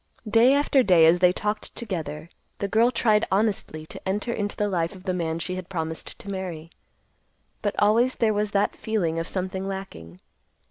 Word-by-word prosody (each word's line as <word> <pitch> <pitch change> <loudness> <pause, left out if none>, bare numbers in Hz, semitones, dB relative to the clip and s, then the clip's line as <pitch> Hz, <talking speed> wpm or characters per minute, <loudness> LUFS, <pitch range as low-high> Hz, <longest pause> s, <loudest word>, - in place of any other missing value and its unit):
Day 230 +5 +5
after 285 -1 +3
day 180 -8 +5
as 165 +2 +5
they 180 0 +5
talked 210 +3 -3
together, 170 -6 -5 0.3
the 200 - -2
girl 225 +4 +4
tried 220 -3 +2
honestly 195 -6 0
to - - -11
enter 210 +5 -1
into 205 -2 -3
the 210 - +1
life 170 -2 -1
of 185 - -13
the 185 -2 -1
man 165 -2 -2
she 175 +2 -4
had 185 -1 -7
promised 160 -3 -4
to - - -13
marry. 180 -4 -5 0.9
But 205 -1 -1
always 230 +5 +3
there 220 -2 +2
was 210 0 0
that 200 0 +1
feeling 175 -7 -1
of 165 - -3
something 190 0 -3
lacking. 95 - -7
195 Hz, 185 wpm, -25 LUFS, 170-210 Hz, 0.9 s, Day